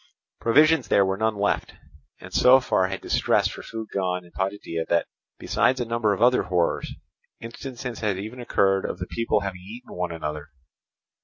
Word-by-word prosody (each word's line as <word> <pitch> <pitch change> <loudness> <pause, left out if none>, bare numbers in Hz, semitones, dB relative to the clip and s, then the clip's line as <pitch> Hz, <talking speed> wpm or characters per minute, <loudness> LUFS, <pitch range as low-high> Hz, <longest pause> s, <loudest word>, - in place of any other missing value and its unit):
Provisions 155 +7 +4
there 100 - +4
were 95 0 0
none 110 +1 0
left; 100 0 -1 0.4
and - - -12
so 130 +1 +7
far 95 -7 +1
had 95 0 -5
distress - - +2
for - - -8
food 110 -2 -7
gone 90 -2 -1
in 85 - -18
Potidæa 95 -3 -3
that, 85 0 +2 0.3
besides 130 0 +1
a 120 - -1
number 115 -2 0
of 100 - 0
other 125 +1 +5
horrors, 90 -2 0 0.5
instances 125 +1 -7
had 105 -4 -1
even 110 +6 -7
occurred 95 -5 +2
of - - -4
the - - -4
people 115 -2 0
having 95 -2 -5
eaten 110 +7 -11
one 90 -1 -3
another. 75 -2 -5
100 Hz, 175 wpm, -25 LUFS, 95-115 Hz, 0.5 s, so